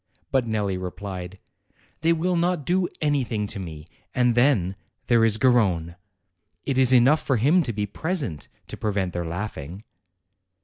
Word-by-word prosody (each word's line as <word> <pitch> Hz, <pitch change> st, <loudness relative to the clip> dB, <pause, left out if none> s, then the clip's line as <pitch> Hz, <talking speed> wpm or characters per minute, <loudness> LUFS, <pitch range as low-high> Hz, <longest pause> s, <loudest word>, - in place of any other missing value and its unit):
But 130 Hz, -3 st, +2 dB
Nelli 105 Hz, -4 st, -1 dB
replied: 95 Hz, 0 st, -6 dB, 0.6 s
"They 165 Hz, +1 st, +2 dB
will 175 Hz, +2 st, +1 dB
not 170 Hz, -3 st, 0 dB
do 180 Hz, 0 st, +1 dB
anything 130 Hz, -8 st, 0 dB
to 105 Hz, 0 st, -4 dB
me 80 Hz, -5 st, -8 dB, 0.3 s
and 125 Hz, -1 st, +3 dB
then, 120 Hz, -7 st, +2 dB, 0.3 s
there 120 Hz, -2 st, +4 dB
is 110 Hz, -1 st, +3 dB
Garrone. 100 Hz, -10 st, +2 dB, 0.7 s
It 135 Hz, -2 st, 0 dB
is 130 Hz, -1 st, +5 dB
enough 130 Hz, +5 st, +5 dB
for 135 Hz, -, 0 dB
him 150 Hz, +11 st, +4 dB
to 130 Hz, -7 st, -2 dB
be 105 Hz, -1 st, -2 dB
present, 135 Hz, -, -3 dB, 0.2 s
to -, -, -8 dB
prevent 100 Hz, -4 st, -1 dB
their 85 Hz, -1 st, -3 dB
laughing." 90 Hz, 0 st, -6 dB
115 Hz, 150 wpm, -24 LUFS, 95-140 Hz, 0.7 s, is